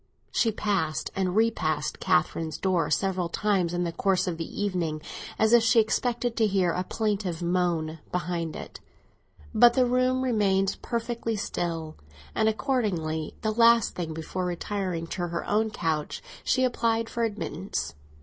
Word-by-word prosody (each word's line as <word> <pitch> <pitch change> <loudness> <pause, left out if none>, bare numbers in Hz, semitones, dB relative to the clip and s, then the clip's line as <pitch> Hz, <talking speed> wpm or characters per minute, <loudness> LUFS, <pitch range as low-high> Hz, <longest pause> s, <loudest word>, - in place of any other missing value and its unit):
She 225 - +2
passed 195 -8 -1
and 185 -1 0
repassed 160 -10 +1
Catherine's 155 +1 +1
door 180 -5 +1
several 185 -3 0
times 190 -3 +1
in 175 0 -1
the 170 - -1
course 185 +1 +1
of 175 -3 -2
the 165 - -6
evening, 170 -6 -1 0.4
as 220 +1 +3
if 240 - +8
she 225 +1 +5
expected 235 +2 0
to 220 -2 +4
hear 190 -3 +2
a 180 - -1
plaintive 200 -5 -2
moan 170 -3 0
behind 170 -2 -2
it. - - -8 0.7
But 240 0 +6
the 255 -1 +4
room 255 +1 +2
remained 195 -6 +2
perfectly 230 -1 -2
still; 165 -5 -3 0.4
and 220 0 +3
accordingly, 190 - -1
the 215 - +1
last 230 0 +5
thing 170 -3 -4
before 160 +3 -4
retiring 180 -1 -2
to 175 +1 -3
her 170 0 -4
own 220 +1 +2
couch, 160 -6 -2 0.2
she 260 - +2
applied 230 -2 +1
for 235 - -2
admittance. 200 -4 -3
190 Hz, 150 wpm, -27 LUFS, 170-225 Hz, 0.7 s, if